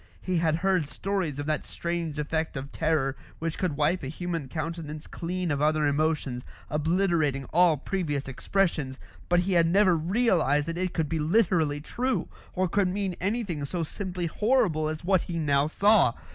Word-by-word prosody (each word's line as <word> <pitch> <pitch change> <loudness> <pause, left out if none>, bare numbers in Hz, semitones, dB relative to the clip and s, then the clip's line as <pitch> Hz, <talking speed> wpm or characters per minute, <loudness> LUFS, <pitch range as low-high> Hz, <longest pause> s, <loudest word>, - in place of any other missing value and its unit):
He 185 -1 -1
had 160 -2 +2
heard 180 -2 +1
stories 185 -5 -2
of 145 - -3
that 155 0 -1
strange 170 -3 -3
effect 160 0 -2
of 135 +1 -6
terror 150 -4 0 0.2
which 165 0 -3
could 175 -7 -1
wipe 155 +5 +2
a 135 - -5
human 165 0 -4
countenance 155 +1 -5
clean 180 0 -3
of 145 -1 -1
other 155 0 +3
emotions, 145 -4 0 0.3
obliterating 155 -3 +1
all 170 -2 +5
previous 150 -3 -2
expressions; 145 -1 -1 0.3
but 175 0 +4
he 185 +1 -1
had 170 -1 +4
never 190 +1 +4
realised 165 - +2
that 165 +1 -4
it 185 -1 -2
could 160 -3 0
be 160 +1 -2
literally 160 -4 +2
true, 250 - -1 0.3
or 185 0 +1
could 195 +2 +2
mean 190 -1 -2
anything 200 -6 -1
so 165 +4 -2
simply 180 +2 -4
horrible 185 -5 +1
as 155 +1 -5
what 190 0 +3
he 170 - -4
now 145 -2 +2
saw. 200 - +4
165 Hz, 175 wpm, -27 LUFS, 150-185 Hz, 0.3 s, all